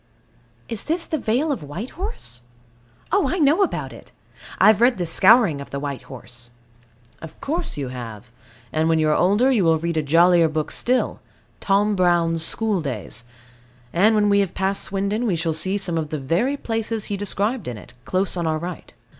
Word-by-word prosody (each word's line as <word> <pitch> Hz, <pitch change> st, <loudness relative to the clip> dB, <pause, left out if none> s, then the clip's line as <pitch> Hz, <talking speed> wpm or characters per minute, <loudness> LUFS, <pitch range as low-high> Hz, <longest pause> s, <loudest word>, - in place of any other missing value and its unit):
Is 230 Hz, -3 st, -5 dB
this 335 Hz, +2 st, -1 dB
the 315 Hz, -, -2 dB
Vale 260 Hz, +7 st, 0 dB
of 270 Hz, -, -2 dB
White 170 Hz, -, -7 dB
Horse? 370 Hz, -, -6 dB, 0.7 s
Oh, 395 Hz, +2 st, +2 dB
I 365 Hz, -, -1 dB
know 305 Hz, +3 st, +3 dB
about 390 Hz, -, -1 dB
it; -, -, -14 dB, 0.5 s
I -, -, +4 dB
have 215 Hz, 0 st, +6 dB
read 245 Hz, 0 st, +4 dB
The 175 Hz, -, -2 dB
Scouring 170 Hz, -, +4 dB
of 140 Hz, -, -9 dB
the 140 Hz, -, -4 dB
White 140 Hz, -2 st, -4 dB
Horse. 120 Hz, -1 st, -7 dB, 0.7 s
Of 160 Hz, -, -11 dB
course 330 Hz, -, -1 dB
you 135 Hz, -3 st, -3 dB
have; 115 Hz, -3 st, -8 dB, 0.4 s
and 160 Hz, +1 st, +1 dB
when 165 Hz, -, +3 dB
you 155 Hz, -1 st, +2 dB
are 150 Hz, -, +3 dB
older 205 Hz, +9 st, +3 dB
you 225 Hz, -7 st, +2 dB
will 165 Hz, -1 st, +4 dB
read 170 Hz, +1 st, -3 dB
a -, -, +3 dB
jollier 170 Hz, +3 st, +4 dB
book 155 Hz, 0 st, -3 dB
still, 255 Hz, +1 st, 0 dB, 0.4 s
Tom 205 Hz, +1 st, +2 dB
Brown's 170 Hz, -3 st, +2 dB
School 210 Hz, +1 st, -1 dB
Days 130 Hz, -4 st, -6 dB, 0.7 s
and 210 Hz, +6 st, +4 dB
when 210 Hz, -1 st, +3 dB
we 200 Hz, 0 st, +4 dB
have 195 Hz, -4 st, -1 dB
passed 195 Hz, +1 st, -1 dB
Swindon, 200 Hz, +4 st, -2 dB
we 190 Hz, -, +1 dB
shall 165 Hz, 0 st, -1 dB
see 185 Hz, +6 st, +1 dB
some 175 Hz, -4 st, 0 dB
of 155 Hz, -2 st, -4 dB
the 155 Hz, -, -3 dB
very 175 Hz, -, 0 dB
places 225 Hz, -3 st, -3 dB
described 205 Hz, +2 st, -1 dB
in 120 Hz, -3 st, -5 dB
it, 115 Hz, -, -13 dB
close 185 Hz, +1 st, 0 dB
on 170 Hz, -2 st, -1 dB
our 155 Hz, 0 st, 0 dB
right. 175 Hz, 0 st, -7 dB
185 Hz, 195 wpm, -22 LUFS, 155-225 Hz, 0.7 s, have